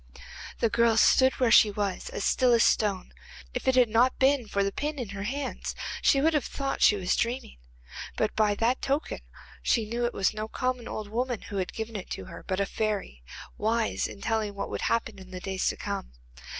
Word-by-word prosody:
The 230 Hz, -, +3 dB
girl 235 Hz, -1 st, +3 dB
stood 260 Hz, +3 st, +5 dB
where 250 Hz, -3 st, +1 dB
she 215 Hz, -, +7 dB
was, 200 Hz, -2 st, -3 dB
as -, -, -4 dB
still 250 Hz, -2 st, +3 dB
as 230 Hz, -, +5 dB
a -, -, +5 dB
stone. 200 Hz, -4 st, +1 dB, 0.4 s
If -, -, -4 dB
it 260 Hz, -, +4 dB
had 250 Hz, -2 st, +6 dB
not 235 Hz, +4 st, +3 dB
been 265 Hz, -3 st, +3 dB
for 200 Hz, -1 st, 0 dB
the 200 Hz, -, 0 dB
pin 295 Hz, +7 st, -3 dB
in 245 Hz, -6 st, -4 dB
her 195 Hz, 0 st, -6 dB
hands 275 Hz, +4 st, -4 dB, 0.3 s
she 275 Hz, -, +4 dB
would 320 Hz, +3 st, +3 dB
have 300 Hz, -, +1 dB
thought 275 Hz, -1 st, -3 dB
she 210 Hz, -, +6 dB
was 185 Hz, -2 st, 0 dB
dreaming. 235 Hz, -, -2 dB, 0.6 s
But -, -, 0 dB
by 210 Hz, -1 st, +3 dB
that 235 Hz, +4 st, +1 dB
token 280 Hz, +3 st, -1 dB, 0.4 s
she 225 Hz, -3 st, +1 dB
knew 235 Hz, +2 st, -2 dB
it 240 Hz, -, -1 dB
was 195 Hz, -, +1 dB
no 215 Hz, 0 st, -4 dB
common 255 Hz, +1 st, -2 dB
old 215 Hz, -1 st, -5 dB
woman 240 Hz, +2 st, -2 dB
who 200 Hz, -, -6 dB
had 185 Hz, -2 st, -2 dB
given 225 Hz, 0 st, -6 dB
it 195 Hz, -, -6 dB
to 95 Hz, -, -8 dB
her, -, -, -10 dB
but 190 Hz, 0 st, -1 dB
a 200 Hz, -, +2 dB
fairy, 205 Hz, -, -3 dB, 0.4 s
wise 225 Hz, +1 st, 0 dB
in -, -, -11 dB
telling 220 Hz, -2 st, -1 dB
what 200 Hz, -, -4 dB
would -, -, -3 dB
happen 230 Hz, -3 st, -1 dB
in 185 Hz, -1 st, -12 dB
the 185 Hz, -1 st, -7 dB
days 190 Hz, 0 st, -2 dB
to -, -, 0 dB
come. 60 Hz, -, -5 dB
225 Hz, 220 wpm, -28 LUFS, 200-250 Hz, 0.6 s, she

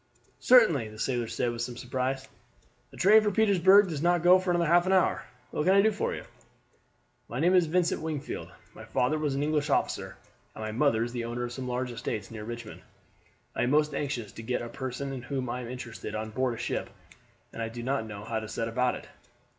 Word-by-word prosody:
"Certainly," 195 Hz, -, +5 dB
the 110 Hz, -, -12 dB
sailor 120 Hz, 0 st, -1 dB
said 120 Hz, +2 st, -1 dB
with 115 Hz, 0 st, -5 dB
some 120 Hz, 0 st, -4 dB
surprise. 130 Hz, +2 st, -2 dB, 0.6 s
"The -, -, -15 dB
train 215 Hz, +3 st, +6 dB
for 210 Hz, -, +1 dB
Petersburg 200 Hz, -1 st, +5 dB
does 155 Hz, -5 st, -4 dB
not 175 Hz, 0 st, +2 dB
go 180 Hz, +1 st, +7 dB
for 185 Hz, 0 st, -3 dB
another 175 Hz, -1 st, +2 dB
half 175 Hz, +3 st, +4 dB
hour. 190 Hz, -1 st, +2 dB, 0.3 s
What 150 Hz, -, -1 dB
can 190 Hz, +2 st, +5 dB
I 200 Hz, -, +6 dB
do 220 Hz, -, +4 dB
for 210 Hz, -, -2 dB
you?" -, -, -7 dB, 1.1 s
"My 120 Hz, -, -4 dB
name 175 Hz, +4 st, +3 dB
is 180 Hz, -3 st, +4 dB
Vincent 175 Hz, +2 st, +1 dB
Wingfield. 155 Hz, -3 st, -4 dB, 0.2 s
My -, -, -11 dB
father 150 Hz, +5 st, 0 dB
was 150 Hz, -3 st, -1 dB
an 140 Hz, -, 0 dB
English 150 Hz, 0 st, 0 dB
officer, -, -, -1 dB, 0.4 s
and 110 Hz, -, -6 dB
my 110 Hz, -, -3 dB
mother 115 Hz, -1 st, +2 dB
is 120 Hz, -, -4 dB
the 120 Hz, -2 st, -3 dB
owner 120 Hz, +1 st, -3 dB
of 120 Hz, 0 st, -4 dB
some 130 Hz, 0 st, -5 dB
large 125 Hz, 0 st, -2 dB
estates 115 Hz, -3 st, -4 dB
near 110 Hz, -2 st, -7 dB
Richmond. 115 Hz, -1 st, -8 dB, 0.7 s
I -, -, -1 dB
am 125 Hz, -, +2 dB
most 150 Hz, +1 st, +2 dB
anxious 125 Hz, -7 st, -3 dB
to -, -, -9 dB
get 120 Hz, +2 st, -2 dB
a 120 Hz, -, -6 dB
person 130 Hz, +2 st, -5 dB
in 130 Hz, -, -5 dB
whom 130 Hz, 0 st, -3 dB
I 125 Hz, +1 st, -3 dB
am 120 Hz, -, -7 dB
interested 125 Hz, -2 st, -7 dB
on 110 Hz, 0 st, -4 dB
board 125 Hz, -1 st, -1 dB
ship, -, -, -3 dB, 0.6 s
and -, -, -6 dB
I 115 Hz, -, -2 dB
do 120 Hz, +1 st, -7 dB
not 130 Hz, -3 st, -1 dB
know 105 Hz, -1 st, -8 dB
how 110 Hz, +1 st, -2 dB
to 110 Hz, -, -7 dB
set 115 Hz, +1 st, -3 dB
about 125 Hz, +2 st, +1 dB
it." -, -, -10 dB
130 Hz, 225 wpm, -28 LUFS, 120-165 Hz, 1.1 s, go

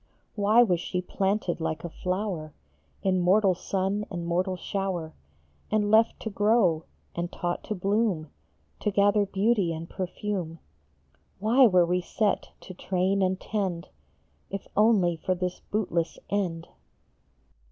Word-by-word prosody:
Why 215 Hz, +3 st, +5 dB
was 180 Hz, -7 st, +1 dB
she 180 Hz, +1 st, -3 dB
planted 190 Hz, -1 st, -1 dB
like 160 Hz, -2 st, -2 dB
a 170 Hz, -, -4 dB
flower 180 Hz, -3 st, -3 dB, 0.5 s
In 185 Hz, -1 st, +2 dB
mortal 190 Hz, +2 st, +4 dB
sun 195 Hz, +3 st, -1 dB
and 175 Hz, -3 st, -5 dB
mortal 180 Hz, +2 st, 0 dB
shower, 180 Hz, -4 st, -3 dB, 0.6 s
And 210 Hz, -1 st, +1 dB
left 220 Hz, +1 st, +4 dB
to 220 Hz, -, -4 dB
grow, 200 Hz, -6 st, +2 dB, 0.3 s
and 175 Hz, +1 st, -3 dB
taught 175 Hz, 0 st, -3 dB
to 215 Hz, -, -3 dB
bloom, 195 Hz, -4 st, 0 dB, 0.5 s
To -, -, 0 dB
gather 205 Hz, 0 st, +3 dB
beauty 200 Hz, -2 st, +1 dB
and 165 Hz, 0 st, -5 dB
perfume; 185 Hz, -2 st, -4 dB, 0.8 s
Why 235 Hz, +6 st, +5 dB
were 180 Hz, -4 st, +4 dB
we 180 Hz, +1 st, 0 dB
set 210 Hz, +3 st, -1 dB
to 185 Hz, -, -9 dB
train 190 Hz, +2 st, 0 dB
and 185 Hz, 0 st, +1 dB
tend 190 Hz, -5 st, -3 dB, 0.6 s
If 195 Hz, 0 st, -6 dB
only 200 Hz, -6 st, +4 dB
for 185 Hz, +3 st, -1 dB
this 180 Hz, 0 st, -3 dB
bootless 175 Hz, -6 st, -1 dB
end? 175 Hz, -5 st, -1 dB
190 Hz, 135 wpm, -27 LUFS, 175-205 Hz, 0.8 s, Why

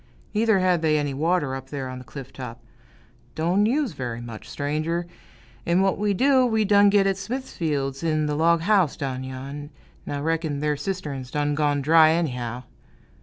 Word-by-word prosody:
Neither 220 Hz, -1 st, +3 dB
had 185 Hz, -2 st, +2 dB
they 155 Hz, -1 st, +3 dB
any 145 Hz, -2 st, -1 dB
water, 150 Hz, -1 st, 0 dB
up 135 Hz, 0 st, -6 dB
there 135 Hz, -2 st, -4 dB
on 130 Hz, 0 st, -6 dB
the -, -, -10 dB
cliff 135 Hz, 0 st, -10 dB
top 125 Hz, -3 st, -8 dB, 0.7 s
"don' 180 Hz, +6 st, +2 dB
use 275 Hz, 0 st, +1 dB
very 125 Hz, -4 st, -4 dB
much, 115 Hz, -2 st, -9 dB
stranger; 155 Hz, +4 st, -2 dB, 0.6 s
'n' 170 Hz, +2 st, +2 dB
what 195 Hz, 0 st, +1 dB
we 205 Hz, -1 st, +1 dB
do, 260 Hz, +3 st, +4 dB
we 220 Hz, -3 st, +2 dB
done 205 Hz, 0 st, +5 dB
git 200 Hz, -1 st, +4 dB
at 195 Hz, -1 st, +1 dB
Smithfield's, 160 Hz, -, -3 dB
in 155 Hz, -2 st, +1 dB
th' 150 Hz, -, -1 dB
log 165 Hz, +2 st, +3 dB
house 185 Hz, -4 st, +2 dB
down 130 Hz, -3 st, -3 dB
yon, 135 Hz, +3 st, -7 dB, 0.4 s
'n' -, -, -4 dB
I -, -, -3 dB
reck'n 160 Hz, -2 st, -1 dB
their 150 Hz, 0 st, 0 dB
cistern's 145 Hz, -7 st, -4 dB
done 145 Hz, 0 st, 0 dB
gone 145 Hz, -1 st, +1 dB
dry, 160 Hz, +1 st, +6 dB
anyhow!" 125 Hz, -7 st, -2 dB
155 Hz, 180 wpm, -24 LUFS, 135-185 Hz, 0.7 s, dry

